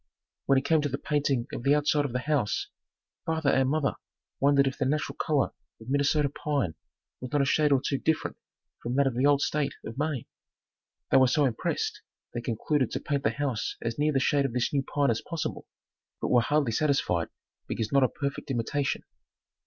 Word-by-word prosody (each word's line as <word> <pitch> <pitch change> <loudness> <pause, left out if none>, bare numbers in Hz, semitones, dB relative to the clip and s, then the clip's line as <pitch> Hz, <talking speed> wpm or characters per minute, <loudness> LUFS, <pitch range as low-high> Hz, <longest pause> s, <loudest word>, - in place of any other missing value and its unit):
When 135 - +5
it 130 - 0
came 160 +1 +3
to 145 - -1
the 135 - -2
painting 140 -5 0
of - - -4
the 140 +3 +4
outside 150 0 +2
of 140 - -3
the 125 +1 -2
house, 145 -8 0 0.5
father 160 -3 +1
and 130 0 +3
mother 150 -1 +1 0.5
wondered 140 0 +4
if 135 0 -1
the 140 - +1
natural 150 +3 -1
color 150 -3 +1 0.3
of 110 +2 -11
Minnesota 145 +1 +2
pine 140 - -1 0.5
was 125 -1 -7
not 145 -1 +3
a - - +1
shade 150 +1 +3
or 135 - +5
two 140 - 0
different 160 -1 0 0.5
from 120 +2 -3
that 140 0 +4
of 135 - +1
the 130 +4 +3
old 145 -1 +4
state 145 -2 -1
of 115 +5 -6
Maine. 145 -5 -1 0.9
They - - +6
were 130 -1 +6
so 145 +3 +3
impressed 120 -4 -2 0.3
they 120 - -3
concluded 125 +3 0
to - - -1
paint 140 -2 -1
the - - +2
house 140 -6 -2
as 115 +2 -4
near 150 +1 +3
the 135 - +2
shade 140 +1 +2
of 130 - -2
this 125 +2 0
new 140 - +2
pine 140 -1 +1
as 115 - -1
possible, 165 -2 -4 0.5
but - - -2
were 120 - +5
hardly 145 0 +1
satisfied 115 - +1 0.4
because 110 -2 -2
not 140 - +4
a 130 - +3
perfect 140 -1 -4
imitation. 135 +3 -1
140 Hz, 205 wpm, -28 LUFS, 130-145 Hz, 0.9 s, They